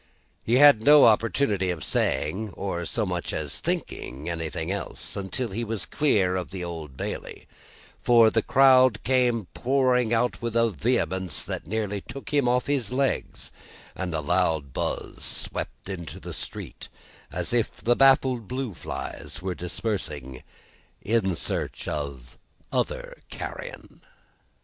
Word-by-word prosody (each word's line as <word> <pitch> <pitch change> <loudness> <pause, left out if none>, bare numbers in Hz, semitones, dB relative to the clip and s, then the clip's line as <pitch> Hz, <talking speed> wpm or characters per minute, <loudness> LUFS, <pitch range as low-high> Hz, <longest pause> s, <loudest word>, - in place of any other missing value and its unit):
He 115 - +2
had 140 -4 +8
no 145 +4 +8
opportunity 110 -3 +2
of 85 -4 -3
saying, 105 +1 -1
or 85 -3 -3
so 110 - 0
much 90 -2 -3
as - - -3
thinking, 70 +5 -4
anything 80 0 -3
else, 100 - -3
until 100 +5 -2
he 110 +5 -3
was 110 -3 -3
clear 100 -11 +2
of 90 -1 -3
the 95 -2 -5
Old 80 -6 -7
Bailey; - - -5 0.5
for, 115 -2 +5
the 110 - +2
crowd 130 -3 +5
came 125 -4 +2
pouring 125 -2 +2
out 120 +1 +1
with 115 -1 -3
a 115 -1 +3
vehemence 90 +3 0
that - - -5
nearly 105 0 -2
took 135 +7 -9
him 140 -4 +3
off 125 +1 +2
his 135 -6 -1
legs, 135 +1 -1 0.4
and 90 -3 -3
a 80 - 0
loud 80 -4 +1
buzz - - -3
swept - - -5
into 85 -4 -6
the - - -7
street - - -7 0.4
as - - -2
if 120 -2 +1
the 120 +3 +4
baffled 130 -4 +4
blue 130 -3 -3
flies 85 - -6
were 95 -1 -1
dispersing 85 - -4 0.6
in 100 -5 +1
search - - -2
of 70 -4 -5 0.3
other - - -2
carrion. - - -8
105 Hz, 140 wpm, -26 LUFS, 90-125 Hz, 0.6 s, had